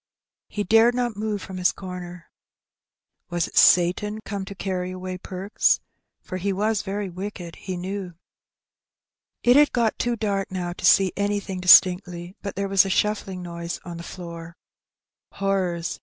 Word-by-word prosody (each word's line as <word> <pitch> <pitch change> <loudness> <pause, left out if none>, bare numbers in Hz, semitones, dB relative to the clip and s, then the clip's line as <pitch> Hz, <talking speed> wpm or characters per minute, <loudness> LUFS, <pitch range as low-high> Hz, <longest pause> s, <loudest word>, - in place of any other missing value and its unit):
He 205 - -3
dared 225 +4 +4
not 240 -3 -1
move 210 -1 -3
from 190 -1 -7
his 180 0 +3
comer. 180 -2 -9 1.0
Was 175 -1 -1
it - - -14
Satan 185 +5 +4
come 200 -2 -4
to 200 - -9
carry 185 -2 -3
away 185 0 -6
Perks? 190 +3 0 0.4
for 185 - -5
he 195 +2 -1
was 210 +2 0
very 200 +1 -3
wicked, 180 -1 -7
he 185 -2 -5
knew. 185 -1 -5 1.3
It 245 +1 +5
had 295 0 +6
got 235 -3 0
too 240 0 0
dark 200 -3 -2
now 180 -2 -3
to - - -5
see 190 -2 +5
anything 200 -2 -2
distinctly; 180 0 +5
but 200 - -5
there 200 +1 -2
was 195 -1 +5
a 195 - -4
shuiBling 195 -2 -1
noise 170 0 -5
on 175 -1 -7
the - - -7
floor. 170 -2 -9 0.8
Horrors! 185 -4 -1
190 Hz, 155 wpm, -24 LUFS, 180-205 Hz, 1.3 s, had